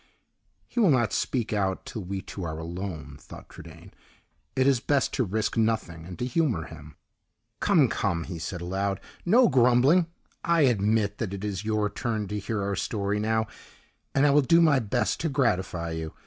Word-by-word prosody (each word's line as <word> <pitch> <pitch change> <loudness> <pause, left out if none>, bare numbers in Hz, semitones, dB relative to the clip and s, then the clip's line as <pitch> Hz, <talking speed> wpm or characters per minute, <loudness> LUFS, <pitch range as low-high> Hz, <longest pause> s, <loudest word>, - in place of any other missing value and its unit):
"He - - -4
will 210 -6 +5
not 120 -6 +2
speak 120 -4 -1
out 95 -2 -1
till 110 - -6
we 95 +1 -4
two 95 - -7
are 80 -2 -4
alone," 80 -3 -6
thought - - -12
Trudaine. - - -13 0.6
"It 130 - +2
is 135 -3 +4
best 140 +2 0
to 130 - +1
risk 110 +1 -1
nothing, 110 -8 -1
and 90 - -8
to 125 - -2
humor 125 - 0
him." 75 -1 -12 0.6
"Come, - - +4
come," 85 -1 -1
he 85 -2 -7
said 85 +2 -5
aloud; 95 +2 -2 0.3
"no 235 +7 +6
grumbling. 130 +7 +4 0.4
I 170 -1 +3
admit 105 -4 +2
that 100 -4 -3
it 100 - -7
is 100 -2 -3
your 110 -1 +1
turn 110 -1 -3
to 105 0 -3
hear 100 +1 -3
our 100 0 -1
story 100 +1 -2
now; 110 +1 +1 0.7
and 135 +1 +4
I 145 - +5
will 145 +1 +5
do 165 +5 +4
my 155 -5 +5
best 120 +1 -1
to 165 - -1
gratify 95 - 0
you. 80 -1 -5
105 Hz, 185 wpm, -26 LUFS, 95-130 Hz, 0.7 s, no